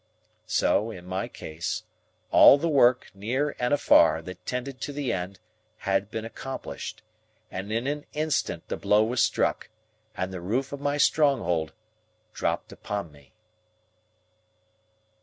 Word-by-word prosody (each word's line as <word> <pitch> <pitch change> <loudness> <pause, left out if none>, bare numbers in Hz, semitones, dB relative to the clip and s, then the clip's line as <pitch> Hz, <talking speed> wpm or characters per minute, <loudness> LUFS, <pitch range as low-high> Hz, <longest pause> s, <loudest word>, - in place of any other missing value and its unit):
So, 110 - +2
in 90 -5 -9
my 95 +1 -3
case; 80 +1 -5 0.5
all - - +9
the 165 +4 -1
work, 130 -5 +4
near 125 +9 -1
and 125 0 0
afar, 80 - +5
that 90 +1 -9
tended 125 +1 -4
to - - -3
the 145 -2 -2
end, 90 +1 -4 0.4
had 95 +1 0
been 110 +1 -4
accomplished; 135 +3 -7 0.5
and 95 +3 -5
in 115 +3 -1
an 145 +1 -3
instant 155 0 -1
the - - -3
blow 105 +1 +3
was 120 +2 +1
struck, - - 0 0.5
and 95 +1 -2
the 90 - -5
roof 120 +10 -1
of 140 - -6
my 145 0 0
stronghold 115 - +2 0.6
dropped - - -2
upon 100 -6 -5
me. 70 -1 -20
110 Hz, 140 wpm, -27 LUFS, 95-140 Hz, 0.6 s, all